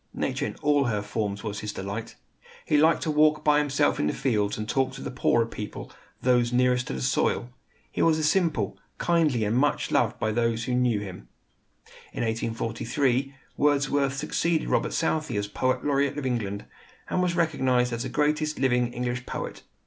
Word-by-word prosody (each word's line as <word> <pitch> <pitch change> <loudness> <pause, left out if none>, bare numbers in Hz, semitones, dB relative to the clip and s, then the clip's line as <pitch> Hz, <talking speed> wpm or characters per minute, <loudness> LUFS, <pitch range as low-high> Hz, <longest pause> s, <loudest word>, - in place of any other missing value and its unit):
Nature - - -1
in - - -6
all 145 -1 +3
her 105 -4 -1
forms 105 -1 -3
was 105 -2 -4
his 105 0 -4
delight. 100 +4 -5 0.5
He - - +1
liked 155 +2 +4
to 155 - 0
walk 150 0 +3
by 150 -1 +4
himself 140 - +1
in 75 - +1
the - - 0
fields, 105 -6 0
and 110 0 -4
to - - -2
talk 135 -1 +2
with - - -8
the - - -4
poorer 120 -2 +2
people, 105 -2 -7 0.3
those 125 -2 +3
nearest 125 0 +2
to - - -3
the 65 -1 -4
soil. 120 - 0 0.4
He - - -2
was 155 -2 +3
simple, 150 - +1 0.2
kindly, 155 -9 +2
and 105 +2 0
much 145 +4 +1
loved - - +2
by 110 - 0
those 115 0 0
who 125 - -2
knew 125 -4 +2
him. 90 -11 -8 0.9
In - - -2
1843 120 +4 -1 0.2
Wordsworth 140 -1 +2
succeeded 165 +3 0
Robert - - +1
Southey 155 -7 0
as 100 - 0
poet 130 +4 -1
laureate 140 0 +1
of 145 - -3
England, 105 -6 -2 0.4
and 180 - 0
was 180 -1 +1
recognized 130 -7 +1
as 115 - -3
the - - -3
greatest 150 +1 0
living 125 -2 +2
English 125 0 -3
poet. - - -5
125 Hz, 185 wpm, -26 LUFS, 110-150 Hz, 0.9 s, liked